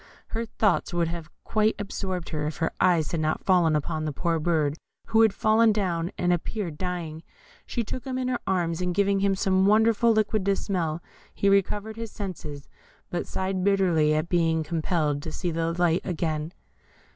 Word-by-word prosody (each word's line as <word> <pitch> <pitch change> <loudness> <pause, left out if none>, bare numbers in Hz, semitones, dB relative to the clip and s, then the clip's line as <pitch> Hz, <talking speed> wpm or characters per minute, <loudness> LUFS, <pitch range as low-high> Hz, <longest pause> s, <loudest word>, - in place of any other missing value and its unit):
Her 230 +1 -3
thoughts 190 -5 +1
would 170 -1 +1
have 165 -2 -6
quite 215 0 +1
absorbed 190 -3 -4
her 150 -2 -2
if 155 - -5
her 165 - 0
eyes 170 -4 +3
had 165 - -1
not 155 0 -1
fallen 175 -5 +4
upon 155 +1 -2
the 155 - -1
poor 165 +3 -1
bird, 155 -3 +1 0.3
who 225 0 +4
had 220 -2 +6
fallen 220 +2 +4
down, 180 -5 -1
and 175 0 +2
appeared 175 -2 -3
dying. 175 -4 -4 0.5
She 235 - -2
took 250 +3 -5
him 260 -1 -3
in 255 -1 -1
her 250 -1 -1
arms, 175 -3 0
and 180 -1 -1
giving 200 0 +2
him 195 0 +2
some 190 0 +2
wonderful 225 +2 +4
liquid 215 -1 +1
to 200 0 +3
smell, 170 -5 -2 0.3
he 200 - +2
recovered 205 +2 +1
his 230 -1 -5
senses, 155 -9 -7 0.4
but 175 - -2
sighed 190 -1 -2
bitterly 175 -6 +3
at 155 +2 0
being 165 -2 +2
compelled 155 -2 -1
to 160 - -6
see 175 +1 -3
the 165 0 -1
light 170 0 +2
again. 160 -3 -2
180 Hz, 185 wpm, -26 LUFS, 160-200 Hz, 0.5 s, had